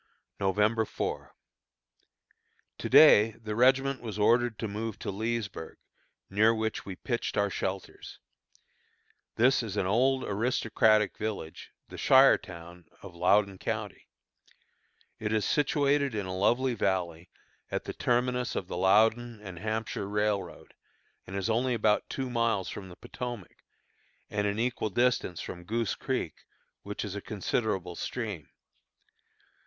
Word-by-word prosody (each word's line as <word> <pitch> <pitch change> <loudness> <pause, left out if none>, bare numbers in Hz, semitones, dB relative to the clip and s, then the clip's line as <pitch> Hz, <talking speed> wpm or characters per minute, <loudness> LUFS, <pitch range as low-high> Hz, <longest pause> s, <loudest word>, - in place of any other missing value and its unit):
November 105 +3 +2
4. - - -5 1.4
To - - -4
day 110 +2 +7
the 110 -1 -6
regiment 135 +3 +3
was 110 -4 -6
ordered 115 +2 +3
to 110 - -3
move 110 +1 -4
to 110 - -4
Leesburg, 110 -4 -4 0.5
near 110 +4 +3
which 110 -1 -3
we 95 - -5
pitched 120 +4 -3
our 100 -1 +1
shelters. 95 +1 -5 1.2
This 130 +4 +4
is 105 -3 -5
an 95 - +1
old, 130 +7 +2
aristocratic 110 -1 +2
village, 105 -7 -5 0.2
the - - -9
shire 135 +1 +6
town 85 -2 -11 0.2
of 100 -3 -10
Loudon 95 +2 +2
County. - - -4 1.1
It 105 -1 -2
is 110 -1 +1
situated 140 -3 +1
in 105 -2 -2
a 95 0 -4
lovely 120 +7 +2
valley, 90 -5 -2 0.4
at - - -3
the - - -6
terminus 125 0 0
of - - -2
the - - -5
Loudon 110 +5 +3
and 95 -5 -9
Hampshire 110 -1 -3
Railroad, 105 -1 -2 0.5
and 95 - -7
is 100 +1 -1
only 120 +2 +1
about 105 -1 +1
two 135 -1 -3
miles 115 -5 0
from 95 -2 -8
the 90 - -11
Potomac, 120 -5 -8 0.7
and 105 0 0
an 100 +1 -1
equal 120 -1 -1
distance 120 -5 0
from 90 - -7
Goose 115 +3 -1
Creek, - - -4 0.4
which 105 +1 -5
is 100 -1 -6
a 100 - -4
considerable 95 -3 -2
stream. 105 - -5
110 Hz, 135 wpm, -29 LUFS, 100-120 Hz, 1.4 s, day